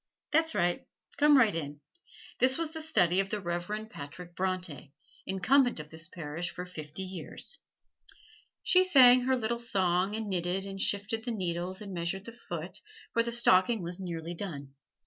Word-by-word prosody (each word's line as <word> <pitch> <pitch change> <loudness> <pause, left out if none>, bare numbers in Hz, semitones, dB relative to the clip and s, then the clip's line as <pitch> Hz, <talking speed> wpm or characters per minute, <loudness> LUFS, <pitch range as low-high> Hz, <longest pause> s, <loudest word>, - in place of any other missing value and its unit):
That's 320 +1 +2
right, 175 0 0 0.3
come 295 -1 +6
right 225 -7 +5
in. 145 -3 -4 0.6
This 260 +1 +4
was 330 -2 -2
the 320 0 -5
study 185 - +3
of 195 0 0
the 210 - -2
Reverend 190 +5 -4
Patrick 170 +5 -9
Bronte, 180 -7 -3 0.3
Incumbent 245 - +3
of 150 0 -8
this 160 +1 -4
Parish 170 -1 -5
for 180 - -6
fifty 155 0 -6
years." 185 - -7 1.0
She 370 0 +5
sang 255 -8 +7
her 260 0 +2
little 235 0 -1
song 190 -3 +1
and 220 -1 -3
knitted 185 0 -1
and 195 -1 -6
shifted 215 +3 -1
the 245 - -4
needles 185 -2 -3
and 200 -2 -7
measured 175 +3 -3
the 230 - -7
foot, 175 -7 -7 0.3
for 230 - +4
the 235 0 -2
stocking 220 -2 +4
was 175 +2 -5
nearly 170 -2 -5
done. 145 -7 -6
190 Hz, 165 wpm, -30 LUFS, 175-235 Hz, 1.0 s, sang